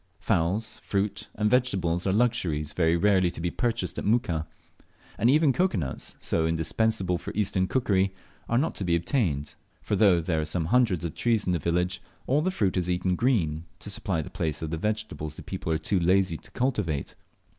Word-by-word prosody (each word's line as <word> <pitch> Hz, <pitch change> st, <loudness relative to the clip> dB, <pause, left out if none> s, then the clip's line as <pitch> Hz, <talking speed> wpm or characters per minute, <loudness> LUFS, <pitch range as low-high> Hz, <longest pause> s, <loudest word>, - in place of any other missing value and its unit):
Fowls, 100 Hz, +2 st, 0 dB
fruit, 100 Hz, 0 st, -2 dB
and 105 Hz, 0 st, +1 dB
vegetables 95 Hz, -8 st, +1 dB
are -, -, +3 dB
luxuries 95 Hz, -10 st, 0 dB
very 80 Hz, 0 st, +2 dB
rarely 95 Hz, -1 st, +3 dB
to -, -, -8 dB
be 85 Hz, +1 st, -1 dB
purchased 120 Hz, -2 st, -2 dB
at -, -, -5 dB
Muka; 90 Hz, -8 st, +1 dB, 0.7 s
and 115 Hz, -, +2 dB
even 150 Hz, 0 st, +4 dB
cocoa 180 Hz, -, +1 dB
nuts, 65 Hz, -7 st, -4 dB
so 80 Hz, -1 st, +1 dB
indispensable 90 Hz, +3 st, 0 dB
for -, -, -6 dB
eastern 95 Hz, -2 st, +1 dB
cookery, 100 Hz, -6 st, +1 dB, 0.4 s
are 120 Hz, -, +2 dB
not 150 Hz, +6 st, +1 dB
to -, -, -5 dB
be 85 Hz, -2 st, +2 dB
obtained; 85 Hz, -, 0 dB, 0.3 s
for -, -, -2 dB
though 100 Hz, -4 st, +5 dB
there 80 Hz, -1 st, 0 dB
are -, -, -2 dB
some 80 Hz, +1 st, -1 dB
hundreds 95 Hz, -4 st, +2 dB
of 85 Hz, -, -3 dB
trees 115 Hz, -3 st, +1 dB
in 90 Hz, -, +1 dB
the 85 Hz, -, +1 dB
village, 90 Hz, +3 st, 0 dB, 0.2 s
all 140 Hz, +4 st, +2 dB
the 180 Hz, -, +1 dB
fruit 100 Hz, -, 0 dB
is 90 Hz, -1 st, 0 dB
eaten 90 Hz, +1 st, +1 dB
green, 85 Hz, -, +1 dB
to 105 Hz, -, -4 dB
supply 95 Hz, -5 st, -1 dB
the -, -, -10 dB
place 80 Hz, 0 st, -2 dB
of 80 Hz, -, -4 dB
the 80 Hz, -, -1 dB
vegetables 105 Hz, -6 st, -3 dB
the -, -, -9 dB
people 80 Hz, -, -4 dB
are 80 Hz, -, +2 dB
too 95 Hz, +3 st, 0 dB
lazy 90 Hz, 0 st, +3 dB
to 110 Hz, -, -11 dB
cultivate. 105 Hz, -, -1 dB
95 Hz, 200 wpm, -27 LUFS, 85-110 Hz, 0.7 s, though